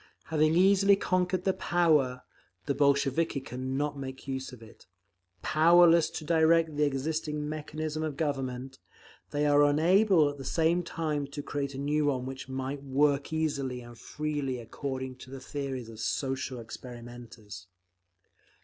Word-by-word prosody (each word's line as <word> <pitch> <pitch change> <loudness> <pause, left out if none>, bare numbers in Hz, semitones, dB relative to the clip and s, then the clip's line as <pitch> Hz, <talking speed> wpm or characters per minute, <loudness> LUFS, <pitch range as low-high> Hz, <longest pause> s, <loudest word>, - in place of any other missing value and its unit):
Having 155 0 +2
easily 195 +2 +5
conquered 185 -1 0
the 190 - +2
power… 150 -10 +2 0.4
the 140 - 0
Bolsheviki 140 +2 +2
can 130 +1 -5
not 145 0 -2
make 135 0 -7
use 130 0 -4
of 120 -3 -12
it. 110 - -17 0.6
Powerless 170 +1 +5
to 155 - -7
direct 160 0 +3
the 150 0 +2
existing 150 +2 -2
mechanism 155 0 -4
of 155 -3 -3
Government, 135 -3 -3 0.5
they 145 0 0
are 145 0 +5
unable 165 +3 +4
at 145 0 -5
the - - -6
same 165 +5 +1
time 155 -4 -3
to 145 +1 -7
create 140 -1 -3
a - - -6
new 145 +2 0
one 130 -3 0
which 135 0 -7
might 135 +1 -4
work 140 +1 +1
easily 140 -5 -2
and 120 0 -12
freely 145 +1 -3
according 130 +2 -5
to 130 - -12
the 135 0 -8
theories 135 -2 -5
of 110 -1 -11
social 130 +2 -2
experimenters. 115 -5 -10
145 Hz, 150 wpm, -29 LUFS, 130-155 Hz, 0.6 s, easily